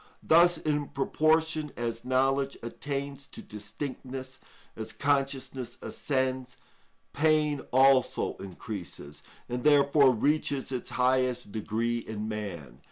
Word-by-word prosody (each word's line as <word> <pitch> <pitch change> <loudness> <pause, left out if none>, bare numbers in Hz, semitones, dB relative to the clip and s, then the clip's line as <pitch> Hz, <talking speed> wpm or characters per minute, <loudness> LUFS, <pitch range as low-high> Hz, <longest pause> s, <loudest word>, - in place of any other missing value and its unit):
Thus, 170 +1 +6
in 150 -2 -1
proportion 155 +1 +1
as 115 -1 -3
knowledge 135 +2 +1
attains 140 +3 -5
to - - -10
distinctness, 130 +4 -7 0.4
as 110 - -6
consciousness 135 -3 -1
ascends, 130 -2 -2 0.6
pain 150 -1 +2
also 130 0 +4
increases, 90 -6 -8 0.3
and 125 0 -3
therefore 140 -1 +6
reaches 140 +2 0
its 125 -2 -3
highest 125 -2 +1
degree 115 +2 -1
in 110 -2 -5
man. 85 - -6
130 Hz, 100 wpm, -29 LUFS, 115-145 Hz, 0.6 s, Thus